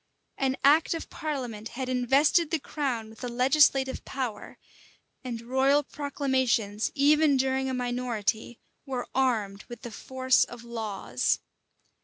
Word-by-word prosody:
An 265 0 0
act 305 +4 +5
of 325 - -7
parliament 245 -8 -4
had 260 -1 -3
invested 270 +6 +3
the 325 - +1
crown 265 -7 -3
with 225 - -13
a - - -2
legislative 265 +2 +3
power; 250 -6 -5 0.7
and 235 -3 -5
royal 265 +4 +3
proclamations, 260 -7 -1
even 295 0 +4
during 265 0 0
a - - -2
minority, 245 -2 -2 0.3
were 255 -2 -3
armed 220 -7 0
with 240 -2 -10
the 240 - -6
force 260 +3 +2
of 240 -1 -8
laws. 215 - -1
255 Hz, 130 wpm, -27 LUFS, 235-275 Hz, 0.7 s, act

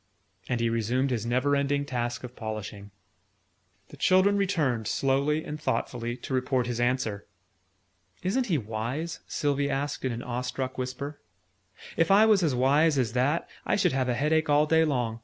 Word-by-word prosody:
And 120 - 0
he 115 - +1
resumed 120 +4 0
his 115 -2 -2
never 130 +4 +2
ending 140 0 0
task 120 -2 -3
of 125 0 -8
polishing. 105 -2 -6 1.0
The - - -12
children 190 +2 +4
returned, 155 - 0
slowly 140 +5 +1
and 150 +1 -6
thoughtfully, 120 -4 -2
to 130 - -7
report 130 -1 +1
his 120 -1 -3
answer. 120 -4 -1 1.0
"Isn't 240 +8 0
he 170 -6 +2
wise?" 120 +8 -4
Sylvie 145 -2 0
asked 140 +1 -2
in 130 - 0
an 115 +1 -5
awestruck 125 +1 -3
whisper. 130 +3 -5 0.8
"If 165 0 +3
I 200 +3 +7
was 215 -3 +4
as 155 -7 +1
wise 145 +4 +3
as 120 -4 0
that, 135 +6 +1 0.2
I - - +1
should 200 - +2
have 130 -1 0
a 120 - +1
head 150 +5 +1
ache 160 -1 +2
all 145 +1 +4
day 160 +1 +4
long. 120 -6 -1
130 Hz, 175 wpm, -27 LUFS, 120-150 Hz, 1.0 s, I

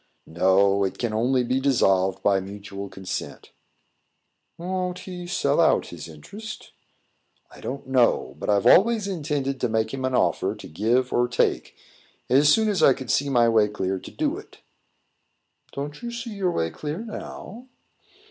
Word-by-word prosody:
"No. 95 +3 +3
It 95 - -2
can 120 -3 -2
only 125 +3 +2
be 130 +2 0
dissolved 95 -9 +2
by 100 -1 +3
mutual 100 0 -8
consent." 95 -1 -6 1.1
"Won't 180 +1 -3
he 180 -2 -8
sell 170 -4 +1
out 165 - +3
his 85 -2 -8
interest?" 200 - -10 0.8
"I - - -14
don't 140 +2 -5
know; 125 - +2
but - - -4
I've 100 -1 +2
always 215 +1 +5
intended 145 -7 -2
to 125 - +1
make 110 +1 0
him 135 -1 -4
an 130 0 0
offer - - +1
to - - -10
give 120 +9 0
or 120 0 +2
take, 120 - 0 0.6
as 140 +3 +5
soon 220 +4 +3
as 205 -5 0
I 135 - +7
could 130 -3 -4
see 140 0 +1
my 120 -3 +4
way 110 -2 +4
clear 95 -2 -2
to - - -10
do - - -2
it." - - -16 1.1
"Don't 145 +1 -6
you 240 - -4
see 235 0 -6
your 195 -3 0
way 80 - -1
clear 150 +1 -5
now?" 230 +2 -8
130 Hz, 165 wpm, -24 LUFS, -, 1.1 s, I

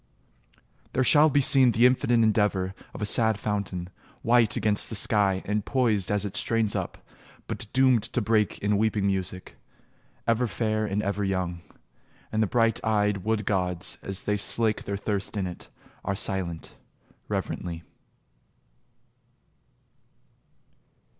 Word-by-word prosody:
There 130 - +2
shall 150 +4 +6
be 145 0 +3
seen 130 -2 +5
the 115 +3 +4
infinite 120 -2 +3
endeavour 105 -4 +1 0.2
Of - - -6
a - - +1
sad 110 0 +2
fountain, 100 -4 -3 0.4
white 115 -2 +3
against 105 -1 +1
the 110 - -5
sky 100 -2 +1
And 105 0 -1
poised 110 -8 +1
as 105 0 +1
it 100 - -6
strains 115 -2 0
up, - - -3 0.5
but - - -6
doomed 130 -3 +4
to 115 +3 -2
break 110 -1 +1
In 105 0 +2
weeping 110 -2 +1
music; 95 -2 -3 0.7
ever 115 +1 +1
fair 110 0 -1
and 105 +1 -1
ever 100 +1 -1
Young... 90 -3 -2 0.7
and 110 - 0
the 110 - +2
bright 115 0 +1
eyed 105 -2 +1
wood 105 +2 -2
gods 90 -2 -1
as 95 0 -4
they 105 0 0
slake 110 +1 +1
Their 100 0 -3
thirst 100 0 -3
in 95 - -1
it, 90 -1 -8 0.4
are 100 - -2
silent, 90 -4 -3 0.5
reverently 85 -2 -4
105 Hz, 140 wpm, -26 LUFS, 95-115 Hz, 0.7 s, shall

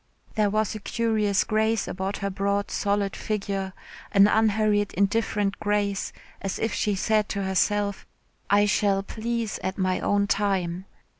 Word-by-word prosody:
There 210 -2 +2
was 215 +1 0
a 215 - -5
curious 215 -2 +1
grace 220 0 +1
about 190 +2 -3
her 200 0 -3
broad 200 +1 -1
solid 200 -1 0
figure, 200 -2 -3 0.4
an 200 0 +7
unhurried 210 -1 +2
indifferent 205 0 +1
grace, 205 -1 0 0.3
as 195 - -3
if 225 - -1
she 205 -1 0
said 215 +2 +1
to 200 - -2
herself, 200 +1 0 0.4
"I 205 +1 +5
shall 200 -1 +2
please 230 0 -3
at 190 - -3
my 185 -1 +1
own 205 0 +2
time." 190 -3 0
205 Hz, 145 wpm, -26 LUFS, 195-215 Hz, 0.4 s, an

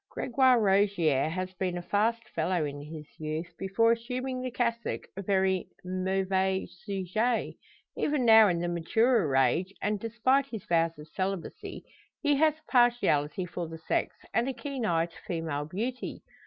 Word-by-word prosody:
Gregoire 260 -1 +3
Rogier 190 -9 +3
has 185 +2 -4
been 180 -1 -2
a - - -4
fast 225 +4 0
fellow 165 0 0
in 145 0 -5
his 150 +1 -8
youth 155 +2 -4
before 195 +4 +3
assuming 255 +2 -2
the 255 - -3
cassock 235 -2 -2
a 195 - -4
very 190 -1 +1 0.2
mauvais 190 +1 0
sujet. 200 +5 -2 0.4
Even 290 -4 0
now 220 -1 +8
in 175 -3 +1
the 175 +1 -1
maturer 175 - +2
age, 135 +9 +2
and 210 0 -1
despite 245 +5 +1
his 225 -7 -7
vows 165 -1 +1
of 150 +1 -11
celibacy, 190 -2 -4 0.4
he 290 -2 +2
has 310 +1 +3
a 310 0 -24
partiality 195 - +3
for 175 -1 -5
the 165 0 -8
sex, 160 - -1 0.2
and 240 +3 +1
a - - -2
keen 255 -1 -4
eye 165 -2 +2
to 170 - -15
female 160 -4 -2
beauty. 230 +10 -4
190 Hz, 160 wpm, -29 LUFS, 170-235 Hz, 0.4 s, now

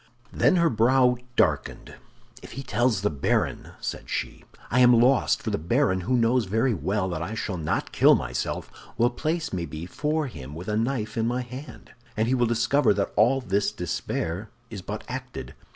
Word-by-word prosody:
Then - - +3
her 170 -3 +3
brow 125 +2 +4 0.2
darkened. - - 0 0.5
"If - - -11
he 135 - -6
tells 120 -6 +1
the 105 - +1
baron," 70 -2 -1
said - - -5
she, - - -4 0.3
"I 130 - +3
am 125 -2 +7
lost—for 125 +2 +3
the - - -1
baron, 95 - +1
who 125 +8 0
knows 120 0 +2
very 115 +6 +1
well 100 0 -1
that 85 -3 -3
I 105 +7 -4
shall 100 -3 -3
not 80 -2 -2
kill - - +6
myself, - - -3 0.3
will 120 +1 +3
place 160 +4 -2
me 85 -2 -2
before 145 - -2
him 75 - -8
with 90 +5 -6
a 105 - 0
knife 115 -1 -1
in 115 0 +1
my 125 +1 -1
hand, 130 +4 -10 0.3
and 110 +1 +1
he 125 - +2
will 120 -2 +2
discover 120 +1 +2
that 100 - -1
all 125 +6 +4
this 100 -3 0
despair 90 +7 -3 0.2
is 100 -4 -6
but 90 - -6
acted." - - -6
115 Hz, 185 wpm, -26 LUFS, 95-130 Hz, 0.5 s, am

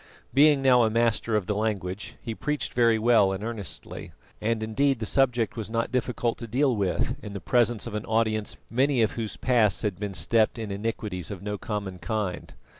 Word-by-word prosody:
Being 145 0 +5
now 125 -2 +6
a 115 - +3
master 115 0 +1
of 105 -4 +1
the 105 - -1
language, 100 -2 -3
he 115 - -4
preached 150 +4 -3
very 115 -2 +4
well 110 -3 +4
and 95 +1 -4
earnestly, 110 -7 -6 0.3
and 110 0 0
indeed 135 +5 +1
the 110 - -4
subject 120 -2 +2
was 110 -2 -5
not 115 +1 -1
difficult 125 -2 -1
to 115 - -6
deal 130 +3 +2
with 100 +5 0
in 105 -2 -7
the 100 - -4
presence 120 0 +1
of - - -6
an 105 +1 -3
audience 110 -1 0
many 130 0 +2
of 110 - +1
whose 110 -3 -4
pasts 115 -6 +2
had 100 -4 -2
been 100 -2 -4
steeped 110 +7 +2
in 110 -3 -5
iniquities 100 -4 -3
of 100 -2 -7
no 105 -1 -4
common 100 -4 -4
kind. 95 +2 -3
110 Hz, 195 wpm, -26 LUFS, 105-120 Hz, 0.3 s, now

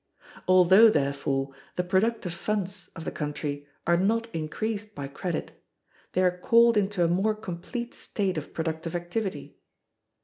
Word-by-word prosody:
Although, 185 +4 +7
therefore, 140 -3 0 0.2
the 180 - 0
productive 190 0 +1
funds 200 -1 -3
of 165 - -7
the - - -2
country 145 -1 -4 0.2
are 170 0 +4
not 230 +5 +1
increased 210 +7 -3
by 140 -1 -4
credit, 155 +4 -4 0.6
they 185 - +2
are 180 0 +2
called 235 +4 +5
into 200 -3 +2
a - - +4
more 195 +6 +2
complete 220 +4 -5
state 195 -3 -2
of 155 -2 -5
productive 160 +1 -3
activity. 175 +4 -4
180 Hz, 140 wpm, -27 LUFS, 160-210 Hz, 0.6 s, Although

